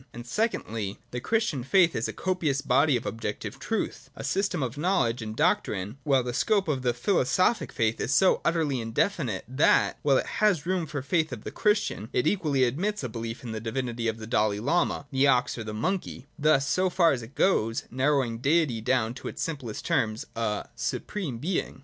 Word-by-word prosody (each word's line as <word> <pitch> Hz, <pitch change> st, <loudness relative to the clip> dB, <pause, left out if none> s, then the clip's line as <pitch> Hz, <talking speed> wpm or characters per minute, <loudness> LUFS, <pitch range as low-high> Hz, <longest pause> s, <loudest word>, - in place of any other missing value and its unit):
And, 120 Hz, 0 st, -8 dB
secondly, 115 Hz, -, -2 dB
the 125 Hz, -, -3 dB
Christian 220 Hz, -, 0 dB
faith 175 Hz, +4 st, +4 dB
is 115 Hz, -, 0 dB
a -, -, -3 dB
copious 165 Hz, -7 st, -1 dB
body 145 Hz, -3 st, +3 dB
of 120 Hz, -, -8 dB
objec 110 Hz, -2 st, -3 dB
tive -, -, -7 dB
truth, -, -, -3 dB
a -, -, -7 dB
system 195 Hz, -5 st, 0 dB
of 125 Hz, 0 st, -3 dB
knowledge 145 Hz, -8 st, +1 dB
and 110 Hz, -1 st, -5 dB
doctrine: 105 Hz, +5 st, 0 dB
while 135 Hz, -4 st, +3 dB
the 120 Hz, 0 st, -3 dB
scope 205 Hz, -, +2 dB
of 140 Hz, -4 st, 0 dB
the 125 Hz, -1 st, +2 dB
philosophic 185 Hz, -, +1 dB
faith 115 Hz, 0 st, 0 dB
is -, -, -1 dB
so 190 Hz, +4 st, +4 dB
utterly 155 Hz, -7 st, +1 dB
indefinite, 115 Hz, -, -1 dB
that, 130 Hz, +5 st, +3 dB
while 140 Hz, -2 st, +4 dB
it -, -, 0 dB, 0.2 s
has 195 Hz, -9 st, +3 dB
room 180 Hz, -2 st, 0 dB
for 150 Hz, -2 st, -4 dB
the 135 Hz, -, -16 dB
faith 160 Hz, -4 st, +1 dB
of 120 Hz, -4 st, -7 dB
the -, -, -6 dB
Christian, 210 Hz, -, 0 dB
it 125 Hz, -, +1 dB
equally 150 Hz, -9 st, +2 dB
admits 175 Hz, -, -1 dB
a 125 Hz, -, -3 dB
belief 115 Hz, +1 st, -6 dB
in 120 Hz, -, -5 dB
the 110 Hz, -1 st, -4 dB
divinity 120 Hz, 0 st, -3 dB
of 110 Hz, 0 st, -1 dB
the 110 Hz, -, -7 dB
Dalai 105 Hz, -2 st, +1 dB
lama, 145 Hz, +4 st, 0 dB
the 135 Hz, +1 st, +3 dB
ox, 125 Hz, -2 st, +2 dB
or 115 Hz, -, -5 dB
the 110 Hz, -, -5 dB
monkey, 130 Hz, -, -3 dB
— -, -, -26 dB
thus, 135 Hz, -2 st, +4 dB
so 185 Hz, 0 st, +2 dB
far 170 Hz, -2 st, +4 dB
as 125 Hz, -, -1 dB
it 115 Hz, +5 st, -12 dB
goes, 115 Hz, -, +2 dB
narrowing 130 Hz, -3 st, +1 dB
Deity 140 Hz, -4 st, +2 dB
down 120 Hz, -1 st, +1 dB
to 125 Hz, -, -8 dB
its -, -, -4 dB
simplest 135 Hz, -9 st, -5 dB
terms, 110 Hz, 0 st, 0 dB
a 110 Hz, -2 st, -2 dB
' -, -, -36 dB
Supreme 165 Hz, -, -4 dB
Being.' 170 Hz, +9 st, -2 dB
130 Hz, 210 wpm, -27 LUFS, 115-170 Hz, 0.2 s, faith